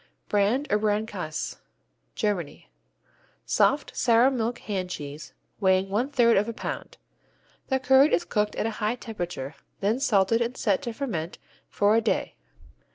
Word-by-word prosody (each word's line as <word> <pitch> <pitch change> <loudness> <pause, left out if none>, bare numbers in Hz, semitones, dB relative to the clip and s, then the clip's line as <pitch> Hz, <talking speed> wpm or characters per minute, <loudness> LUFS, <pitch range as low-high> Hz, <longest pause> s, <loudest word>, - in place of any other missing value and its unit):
Brand 210 +7 +2
or 210 - +3
Brandkäse 205 -7 -2 0.6
Germany 180 - -3 0.7
Soft, - - +2
sour 240 +2 +4
milk 240 -1 -1
hand 190 -4 -4
cheese, 145 -3 -7 0.3
weighing 190 -1 +2
one 225 +7 0
third 240 -6 +4
of 210 +3 +1
a - - -3
pound. - - -6 0.7
The 265 -1 +1
curd 265 +3 +5
is 345 - +2
cooked 210 -1 0
at - - -1
a 225 - 0
high 215 +3 +1
temperature, 175 - -5 0.3
then 210 +5 +1
salted 225 -3 +3
and 235 +2 -2
set 200 -5 +1
to 235 - -4
ferment 185 - -4 0.3
for 205 +1 +3
a 230 - +4
day. 220 - -1
210 Hz, 150 wpm, -26 LUFS, 190-240 Hz, 0.7 s, curd